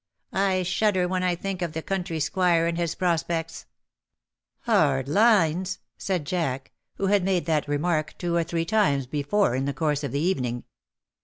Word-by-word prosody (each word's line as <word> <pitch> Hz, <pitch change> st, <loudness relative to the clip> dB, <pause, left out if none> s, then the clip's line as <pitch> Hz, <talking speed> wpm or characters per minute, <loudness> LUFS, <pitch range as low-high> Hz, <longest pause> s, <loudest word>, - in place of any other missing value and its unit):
I 190 Hz, -1 st, +1 dB
shudder 185 Hz, 0 st, +1 dB
when 185 Hz, 0 st, -1 dB
I 180 Hz, -1 st, +1 dB
think 190 Hz, +1 st, -4 dB
of 170 Hz, -3 st, -2 dB
the 160 Hz, -1 st, -4 dB
country 180 Hz, -4 st, -2 dB
squire 170 Hz, +2 st, +2 dB
and 170 Hz, 0 st, 0 dB
his 170 Hz, -1 st, -1 dB
prospects.^' 165 Hz, -2 st, -1 dB, 1.0 s
*^Hard 145 Hz, -, +3 dB
lines,^^ 190 Hz, -1 st, +3 dB, 0.2 s
said 180 Hz, -6 st, -2 dB
Jack, 140 Hz, -5 st, -2 dB, 0.2 s
who 195 Hz, -, -2 dB
had 200 Hz, -1 st, +3 dB
made 185 Hz, -2 st, +1 dB
that 155 Hz, -3 st, 0 dB
remark 155 Hz, +1 st, -1 dB
two 175 Hz, -1 st, -2 dB
or 170 Hz, -, +2 dB
three 165 Hz, 0 st, -2 dB
times 175 Hz, -10 st, +2 dB
before 145 Hz, +5 st, 0 dB
in 130 Hz, +1 st, -1 dB
the 140 Hz, -1 st, -2 dB
course 150 Hz, 0 st, 0 dB
of 140 Hz, -, -3 dB
the 140 Hz, -, -1 dB
evening. 125 Hz, -8 st, -1 dB
170 Hz, 170 wpm, -25 LUFS, 150-185 Hz, 1.0 s, ^Hard